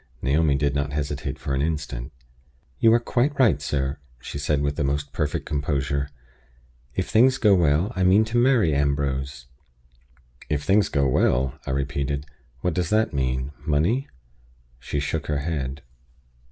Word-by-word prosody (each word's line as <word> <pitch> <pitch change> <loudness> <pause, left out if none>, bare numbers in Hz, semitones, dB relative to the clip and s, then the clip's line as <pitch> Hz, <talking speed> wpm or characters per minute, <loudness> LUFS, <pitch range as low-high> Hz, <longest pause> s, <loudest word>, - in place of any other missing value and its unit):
Naomi 70 +2 +2
did 70 +1 +1
not 70 0 -2
hesitate 70 -2 -3
for 70 - -4
an 65 - 0
instant. 75 -4 -3 0.7
"You 115 - +5
are - - +4
quite 130 +4 0
right, 100 - +4
sir," 70 -1 -2 0.2
she 70 - -7
said 70 0 0
with 70 0 -1
the - - -1
most 70 +1 -2
perfect 75 -1 -2
composure. 70 -1 -1 0.9
"If - - -1
things 125 +4 +4
go 105 -5 +4
well, 85 +4 +2
I 95 - -2
mean 95 +4 +5
to 115 +2 -2
marry 120 - +3
Ambrose." 70 -3 -1 1.0
"If 75 -1 -1
things 100 0 +3
go 70 -2 +1
well," 65 0 +1
I - - -2
repeated. 70 +1 -2 0.4
"What 90 - 0
does 90 -1 -1
that 110 +1 +2
mean? 65 0 -1
Money?" 85 - +1 0.7
She 65 +4 -3
shook 75 +3 -3
her 75 - 0
head. 70 -2 -3
70 Hz, 155 wpm, -24 LUFS, 70-85 Hz, 1.0 s, You